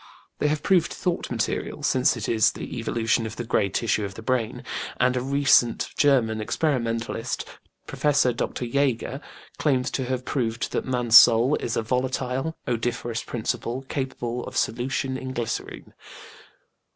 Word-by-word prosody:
They - - +2
have 150 0 -1
proved 185 -4 +3
thought 180 -2 -2
material, - - -2
since 130 -1 +2
it 110 - -4
is 110 -2 +3
the - - -7
evolution 115 0 0
of 110 - -8
the 120 - -4
gray 110 -3 +1
tissue 110 +1 0
of 100 -1 -5
the 115 - -9
brain, 125 -2 -1 0.3
and 125 0 +2
a 125 - 0
recent 130 -3 +3
German 120 -7 +3
experimentalist, 115 -2 -1 0.4
Professor 145 -4 +2
Dr. 120 +1 -3
JÃĪger, 135 +1 -1 0.4
claims 130 -4 +1
to 130 - -2
have 130 0 -3
proved 115 -3 -2
that - - -2
man's 120 -2 +7
soul 120 +5 +5
is 115 - -3
"a - - 0
volatile 130 +5 -1
odoriferous 120 -1 -2
principle, 120 +2 -3
capable 125 -3 -3
of - - -6
solution 130 +2 -1
in 130 0 -6
glycerine". 115 -2 -5
125 Hz, 150 wpm, -25 LUFS, 115-130 Hz, 0.4 s, man's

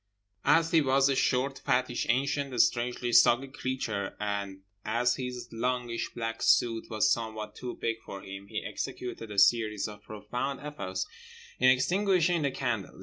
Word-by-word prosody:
As 165 +3 +4
he 165 - +5
was 135 0 +3
a 135 - +2
short, 130 +2 +1
fattish, 125 -1 0
ancient, 135 0 0
strangely 120 +1 +1
soggy 125 +4 +5
creature 130 -7 -3
and 100 -2 -3 0.2
as 120 +3 +1
his 125 -1 -5
longish 120 0 -2
black 115 -1 -4
suit 115 -2 +2
was 110 -2 +2
somewhat 110 -2 -2
too 125 - -6
big 115 0 -2
for 100 -1 -8
him, 100 +1 -9
he - - -4
executed 120 -3 -5
a 105 - -7
series 110 -1 +3
of 105 -1 -10
profound 120 +6 -4
efforts 95 -11 -4 0.5
in 130 - +6
extinguishing 175 +4 +3
the 140 - +1
candles. 120 -9 -3
120 Hz, 150 wpm, -29 LUFS, 110-135 Hz, 0.5 s, in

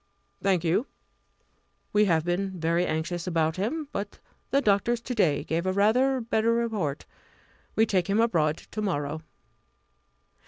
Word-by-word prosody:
"Thank 190 -4 +2
you. 180 +10 +1 1.1
We 210 0 +5
have 165 -4 +2
been 185 +1 -2
very 170 +2 +1
anxious 170 +3 -2
about 160 -2 0
him; 290 - -2
but 200 0 -5 0.3
the 275 - +3
doctors 230 0 +2
to 250 - -5
day 170 -11 +2
give 165 +4 -2
a - - +2
rather 250 +7 +3
better 225 -1 +1
report. 215 -12 -1 0.7
We 220 - +4
take 190 -4 0
him 200 +3 +2
abroad 165 -9 +2
to 215 - -4
morrow." 155 -6 -2
195 Hz, 145 wpm, -27 LUFS, 165-225 Hz, 1.1 s, We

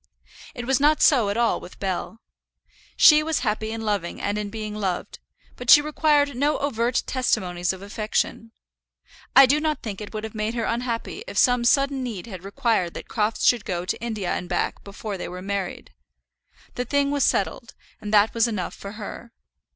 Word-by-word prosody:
It 245 -2 -5
was 265 0 +2
not 300 +2 +4
so 240 -9 +4
at 200 - -2
all 235 -1 +2
with 180 - -12
Bell. 195 +4 -4 0.8
She 305 -1 +8
was 315 0 -1
happy 215 -1 -1
in 225 0 -4
loving 205 -5 -2
and 205 - -1
in 210 -1 -4
being 215 0 -5
loved, 195 -4 -3 0.4
but 250 -1 -7
she - - +10
required 295 -2 +2
no 290 +4 +1
overt 245 -3 0
testimonies 180 -9 0
of 190 0 -9
affection. 215 +2 -2 0.8
I 275 - +10
do 285 +4 +2
not 305 -2 -2
think 210 -3 -5
it 210 - -7
would 215 -1 -5
have 220 - -6
made 215 +1 -2
her 235 - -1
unhappy 235 - -3
if - - -7
some 245 -2 +4
sudden 275 +2 +2
need 225 -8 -5
had 190 -6 -9
required 200 -4 0
that - - -8
Crofts 215 -1 0
should 240 -4 +4
go 175 -2 -3
to 185 - -3
India 215 -6 -3
and 180 - -4
back 175 - -2
before 200 0 -6
they - - -4
were 180 +1 -7
married. 195 -1 -4 0.8
The 250 - -3
thing 280 +2 +1
was 285 -2 +1
settled, 235 +4 -1 0.3
and 210 - -5
that 210 0 +4
was 230 0 +3
enough 210 -6 -3
for 200 0 -9
her. 225 +2 -8
225 Hz, 190 wpm, -24 LUFS, 200-255 Hz, 0.8 s, she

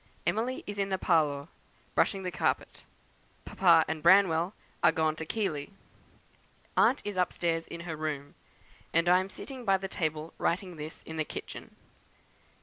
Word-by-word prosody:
Emily 245 +4 -1
is 205 0 -5
in 195 0 0
the 190 - 0
parlour, 150 -5 +2 0.5
brushing 195 -2 +2
the 180 - -3
carpet. - - -1 0.6
Papa 170 -4 +5
and 160 -1 -3
Branwell 175 0 +5 0.3
are - - +6
gone 155 -1 +1
to 160 - -6
Keighley. 165 -10 -2 1.1
Aunt 270 - +4
is 205 -2 -4
upstairs 170 -2 0
in 170 - -7
her 170 -2 -5
room, 150 -2 -4 0.6
and 165 +1 +3
I 180 +1 +6
am 190 +1 -3
sitting 260 +5 -8
by 195 -3 +3
the 195 0 -5
table 160 -3 -3
writing 180 0 -1
this 155 +1 -8
in 160 - -7
the 155 - +1
kitchen. - - -8
170 Hz, 155 wpm, -30 LUFS, 160-195 Hz, 1.1 s, are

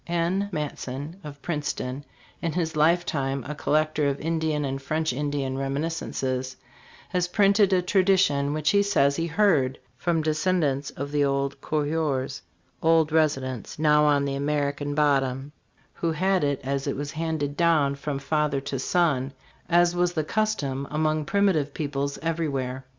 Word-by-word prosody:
N. 175 +4 0
Matson.f 150 +2 -5
of 145 -2 -9
Princeton, 145 -4 -3 0.4
in 165 -3 -1
his 160 -2 -1
lifetime 150 -4 +1
a 150 - -3
collector 155 0 +1
of 140 0 -1
Indian 160 -2 -1
and 135 0 -3
French 155 +1 -1
Indian 140 -1 -2
reminiscences, 135 -2 -2 0.5
has 180 -1 0
printed 200 +1 +4
a 185 -1 +3
tradition, 180 -7 +3
which 155 0 +1
he 200 - +4
says 140 -9 +2
he 165 0 -1
heard 160 -8 +2 0.2
from 165 -1 0
descendants 155 -3 0
of 140 +1 -6
the 145 -1 +2
old 140 0 -1
coureurs, 150 -3 -1 0.4
old 160 -1 +3
residents 135 -6 0
now 150 -1 +4
on 145 -1 +3
the 140 - -2
Amer 140 0 0
ican 145 0 -4
Bottom, 135 -2 +1 0.4
who 170 - -1
had 185 +2 +1
it 140 -2 0
as 140 +1 -2
it 140 - -1
was 145 0 -4
handed 155 -2 -2
down 160 -5 +3
from 140 0 -4
father 145 0 0
to 135 -1 -4
son, 140 -4 +1 0.4
as 175 0 +4
was 175 0 +1
the 155 - 0
custom 150 -9 -1
among 155 0 0
primitive 170 -6 +1
peoples 140 -1 -2
everywhere. 140 -6 -2
150 Hz, 150 wpm, -25 LUFS, 140-165 Hz, 0.5 s, printed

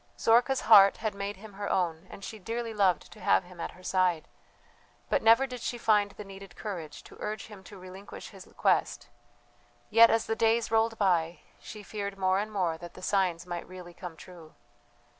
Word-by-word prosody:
Zorka's 245 +3 +3
heart 200 -3 +7
had 220 -2 -3
made 200 0 -5
him 210 +1 -12
her 200 +1 -5
own, 170 -1 -1
and 195 - -11
she 220 - -8
dearly 230 +3 -4
loved 190 -6 +1
to 215 - -14
have 195 - +3
him 175 -1 -12
at - - -5
her 185 - -17
side; 180 -4 +1 0.8
but - - +2
never 230 +4 +5
did 250 -3 -8
she 240 - -3
find 210 -3 +2
the 210 - -10
needed 195 -1 -12
courage 170 -8 -7
to - - -15
urge 210 -1 -4
him 205 -3 -13
to 205 - -12
relinquish 185 +2 -10
his - - -14
quest; - - +1 0.8
yet, 230 +1 +8
as 225 0 +1
the 225 - -1
days 225 0 +1
rolled 225 0 +2
by, 175 -4 +1 0.2
she 210 -1 -10
feared 200 -1 -5
more 190 0 +2
and 215 +1 -4
more 175 -6 -1
that 175 0 -10
the 185 - -12
signs 180 -4 0
might 175 -1 -6
really 180 -1 -11
come 170 -2 -9
true. 170 -3 -14
200 Hz, 195 wpm, -29 LUFS, 180-220 Hz, 0.8 s, yet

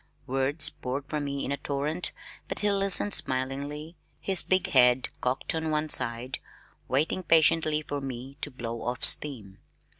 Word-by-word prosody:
Words 135 +5 -2
poured 140 -2 -7
from 150 -2 -5
me 140 0 -5
in - - -5
a 140 - -3
torrent 145 +4 -3 0.4
but - - -7
he 205 0 +1
listened 195 +1 +2
smilingly, 140 +5 -2 0.2
his 190 -2 +1
big 185 -1 0
head 125 -1 +3
cocked 125 +1 -3
on 160 -1 -4
one 155 0 -3
side, 125 0 +7 0.5
waiting 150 +7 -1
patiently 155 -2 +1
for 145 -1 -6
me 135 0 -9
to - - -4
blow 115 -2 -8
off 125 +1 -3
steam. 110 -10 +3
140 Hz, 155 wpm, -26 LUFS, 130-155 Hz, 0.5 s, side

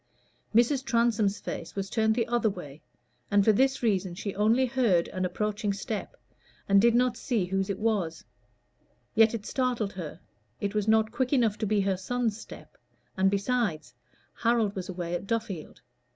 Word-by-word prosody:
Mrs. 250 +3 +4
Transome's 230 -5 +1
face - - -6
was 195 -1 -3
turned 220 +1 +1
the 230 -1 +1
other 240 -1 +2
way, 155 -6 -9 0.5
and 200 -1 +3
for 220 - +7
this 265 +4 +2
reason 190 -5 0
she 200 +2 -4
only 225 +6 +3
heard 235 -9 +2
an 185 0 -2
approaching 210 +2 -1
step, 205 +2 -5 0.5
and 200 0 +5
did 235 +1 +4
not 250 0 +3
see 225 -8 -1
whose 195 +2 -1
it 195 - -2
was; 200 -7 -1 0.9
yet 225 0 +5
it 215 -2 -6
startled 245 -6 -1
her: 170 -5 -7 0.4
it 200 0 -2
was 210 0 -1
not 220 0 +3
quick 260 -1 -1
enough 235 -7 +3
to 215 - -1
be 210 0 +2
her 195 -1 0
son's 230 +3 -1
step, 220 - -12 0.4
and 190 0 +3
besides, 200 -4 -1 0.5
Harold 230 -3 +2
was 190 0 -5
away 175 -2 -4
at 175 +3 -3
Duffield. 215 -8 -4
210 Hz, 170 wpm, -28 LUFS, 195-235 Hz, 0.9 s, for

